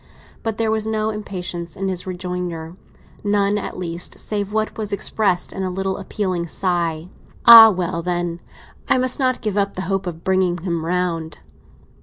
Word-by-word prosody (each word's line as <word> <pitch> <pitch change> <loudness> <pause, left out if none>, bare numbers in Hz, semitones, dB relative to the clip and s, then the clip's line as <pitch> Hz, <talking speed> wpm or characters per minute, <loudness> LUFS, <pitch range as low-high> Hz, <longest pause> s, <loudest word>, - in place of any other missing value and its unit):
But 225 -1 -3
there 225 -1 +1
was 220 0 -1
no 220 0 0
impatience 180 -5 -5
in 195 0 -3
his 185 -1 -3
rejoinder—none, 180 +3 -3
at - - -6
least, 175 -1 -2
save 205 -1 -3
what 215 0 -1
was 215 -2 -5
expressed 200 -2 0
in 195 - -5
a 190 - -1
little 190 +1 -2
appealing 185 -5 -3
sigh. 170 -2 -1 0.4
"Ah, 230 -1 +12
well, 180 -3 -2
then, 175 -1 -2 0.5
I - - +5
must 255 +1 0
not 255 -1 +1
give 210 -2 -2
up 200 0 0
the 185 - -3
hope 195 +1 -2
of 165 -1 -6
bringing 185 -2 +1
him 170 -2 -3
round!" 170 -3 -2
185 Hz, 165 wpm, -21 LUFS, 175-210 Hz, 0.5 s, Ah